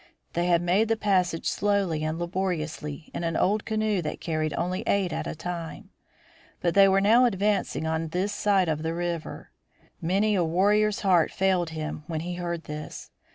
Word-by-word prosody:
They 175 +1 0
had 175 -1 +3
made 190 +6 +2
the 225 0 +1
passage 185 -5 +1
slowly 195 -7 0
and 155 +1 -2
laboriously 170 -4 -3
in - - -4
an 165 -1 -1
old 205 +2 +1
canoe 215 -3 0
that 150 - -4
carried 155 -2 -1
only 180 +2 -1
eight 190 -4 +1
at - - -3
a - - -4
time. 170 0 -6 0.7
But 170 -1 0
they 195 0 +7
were 195 0 +3
now 230 +5 +5
advancing 200 -6 0
on 160 0 -1
this 185 +5 -1
side 200 -3 +2
of 155 -1 -1
the 160 +1 -2
river. 170 -2 -4 0.5
Many 195 +6 +1
a 185 -3 +2
warrior's 205 +5 +2
heart 180 -5 +3
failed 185 -3 +1
him 155 -1 -5
when 160 -2 -3
he 175 +2 -4
heard 170 -1 -4
this. 150 0 -8
175 Hz, 180 wpm, -26 LUFS, 165-200 Hz, 0.7 s, they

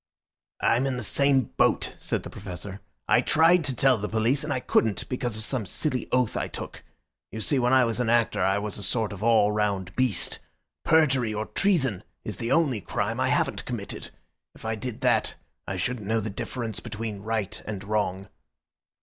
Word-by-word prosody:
"I'm 125 +4 +3
in 130 -2 -1
the 125 - -3
same 140 +3 +2
boat," - - +2
said - - -2
the - - -8
Professor. 95 +1 -7 0.3
"I - - +5
tried 165 +2 +4
to 135 -3 -1
tell 130 -2 +4
the 105 - -3
police 115 +6 +1
and 150 - -3
I 130 - 0
couldn't, 110 -4 +1
because 120 -3 -2
of 110 - 0
some 125 +1 +1
silly 130 - -2
oath 125 -3 +2
I - - -1
took. - - -8 0.5
You 110 - -5
see, 135 +5 +1
when 125 0 +2
I 130 -1 +6
was 115 +1 -1
an 120 -2 +1
actor 120 -1 +2
I 95 +1 +3
was 105 0 -3
a - - -5
sort 110 +1 0
of 100 - -9
all 110 -2 +4
round 100 -3 -1
beast. 130 -5 +1 0.4
Perjury 135 -8 +3
or 110 +1 -2
treason 135 - +1 0.2
is 105 -4 -5
the 115 +3 -3
only 135 -8 +2
crime - - -2
I - - +2
haven't - - 0
committed. - - -5 0.5
If - - -13
I 110 - 0
did 115 +1 -5
that - - +2 0.3
I 95 - -3
shouldn't 105 +2 -2
know 110 +1 +2
the 110 0 -4
difference 115 +2 -4
between 105 -2 -5
right 110 -2 -2
and 105 -2 -4
wrong." 100 -2 -1
115 Hz, 195 wpm, -26 LUFS, 105-130 Hz, 0.5 s, I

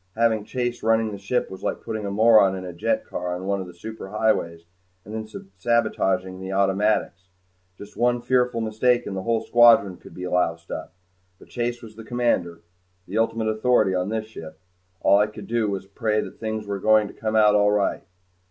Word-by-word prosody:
Having 110 -2 +1
Chase 120 0 -3
running 110 0 +2
the 100 - -7
ship 100 +4 -1
was 95 - -9
like - - -3
putting 110 -2 -4
a - - -2
moron 105 -2 +5
in 95 -1 -6
a 90 - -7
jet 275 - -1
car 90 0 -4
on 90 +1 -6
one 100 0 -1
of 95 - -7
the - - -10
superhighways 95 -3 -2 0.4
and 105 - -9
then 110 0 -5 0.3
sabotaging 95 -4 0
the 95 0 -6
automatics. 95 -2 0 0.5
Just 100 +1 -12
one 120 0 +2
fearful 125 -1 +1
mistake 120 +3 +1
and 95 - -5
a 95 - -3
whole 115 +2 0
squadron 115 -6 +5
could - - -15
be 90 - -7
loused 85 -2 -1
up. 80 - -6 0.4
But - - -18
Chase 120 0 -3
was 110 -1 -11
the 115 - -9
commander 110 -8 -1 0.5
the - - -2
ultimate 115 -1 0
authority 110 -2 +2
on 90 +1 -1
this 110 0 -2
ship. 80 -8 -11 0.4
All 100 - +5
I 105 - +3
could 105 -1 -10
do 115 -1 0
was 95 -1 -4
pray 105 +2 -1
that - - -6
things 110 -1 -4
were 100 -1 -4
going 110 +1 +4
to - - -11
come 110 -1 -3
out 105 -1 +5
all 105 0 +4
right. 105 -1 0
105 Hz, 200 wpm, -24 LUFS, 95-115 Hz, 0.5 s, moron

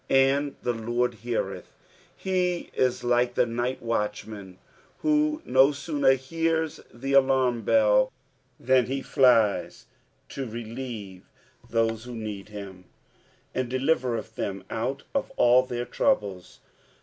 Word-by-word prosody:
" - - -38
And 135 +2 +3
tie 120 - +1
Lord, 120 +1 -1
beartik;" 120 -1 -2 0.6
ne 180 -2 0
is 125 -1 0
like 120 0 +2
the - - +3
night 120 +2 -3
watchman, 105 -4 -3 0.5
who 305 0 +2
no 130 +2 +5
sooner 140 -1 +2
hears 160 +4 -1
the 135 +3 -4
alarm 130 -3 +3
bell 105 -1 +4 0.5
than 130 -1 +3
he 135 +1 -3
flies 115 -6 +3 0.4
to 135 -2 -5
relieve 115 -4 -7 0.4
those 115 0 0
who 125 -1 -7
need 105 -3 -6
hiro. 100 -3 -9 0.3
" - - -35
And 130 -2 -2
dditertth 130 -4 0
than 95 -3 -4
out 130 +5 -2
of 275 -1 -1
all 125 +1 +4
(A«tr 120 0 -1
trouble*." 100 - 0
125 Hz, 125 wpm, -26 LUFS, 110-135 Hz, 0.6 s, no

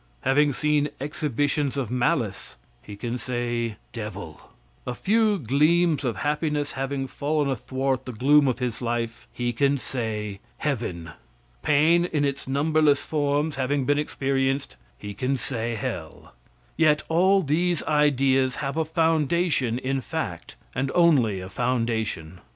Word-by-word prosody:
Having 145 +2 +3
seen 150 +1 +1
exhibitions 145 -1 -1
of 125 -5 -2
malice, 120 - -1 0.2
he 105 - -10
can 120 +4 -4
say, 120 -2 -2 0.2
devil. 100 -9 -7 0.5
A 125 - -2
few 215 - +2
gleams 155 - +2
of 120 -4 -1
happiness 150 0 0
having 135 0 -3
fallen 145 +2 -1
athwart 130 +1 -2
the 130 - -5
gloom 140 +5 +4
of 125 - +1
his 125 -3 -3
life, 115 -1 -3
he 120 0 -2
can 140 +4 +2
say, 110 -6 -4 0.2
heaven. 100 - -3 0.5
Pain, 160 - +4
in 150 -4 0
its 140 -1 -3
numberless 145 +1 +2
forms, 145 0 0
having 135 +1 0
been 145 +2 +2
experienced, 135 -2 -1 0.2
he 105 +8 -7
can 130 +6 -1
say, 120 -2 -2
hell. 105 - -6 0.4
Yet 155 -2 +3
all 190 +4 +4
these 170 +4 +1
ideas 135 -3 +2
have 140 +1 -3
a 160 - +1
foundation 160 -5 +1
in 135 +1 -2
fact, 115 - -5 0.2
and 135 +1 -1
only 135 - +4
a 95 - -7
foundation. 110 -7 -2
135 Hz, 135 wpm, -25 LUFS, 120-150 Hz, 0.5 s, gloom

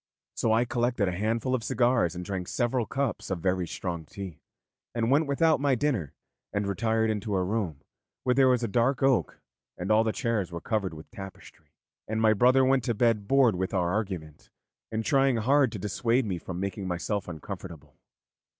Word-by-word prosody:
So 115 - 0
I 115 +2 +3
collected 120 -3 0
a - - 0
handful 115 +7 -1
of 125 -3 0
cigars 120 -9 +2
and 90 0 -5
drank 95 -2 -4
several 120 -1 0
cups 140 0 -2
of 95 - -1
very 90 0 0
strong 85 -2 -4
tea, 95 0 -8 0.6
and 115 +1 +1
went 150 +2 +3
without 155 +3 +3
my 140 -2 +3
dinner, 115 - -1 0.4
and 100 0 -1
retired 110 +3 +1
into 105 -1 -2
a 95 - +1
room 90 -7 -2 0.4
where 125 - +3
there 135 0 +5
was 125 -2 +3
dark 120 +5 +1
oak 135 -2 +2 0.4
and 90 +4 -2
all 110 +1 +5
the 110 - 0
chairs 115 - -1
were 85 - -4
covered 100 -4 -2
with 80 - -12
tapestry; 95 -8 -12 0.3
and 110 +1 -2
my 110 -1 +5
brother 130 +5 +4
went 130 -1 +3
to 120 - 0
bed 110 -3 +2
bored 135 -3 +5
with 95 +2 -2
our 90 -2 +1
argument, 90 -8 -4 0.4
and 110 0 -2
trying 135 -4 +3
hard 130 +2 +3
to 110 - -5
dissuade 115 +6 0
me 95 -4 -2
from 90 +1 -6
making 95 0 -3
myself 95 +3 -2
uncomfortable. 85 -1 -8
110 Hz, 185 wpm, -28 LUFS, 95-125 Hz, 0.6 s, there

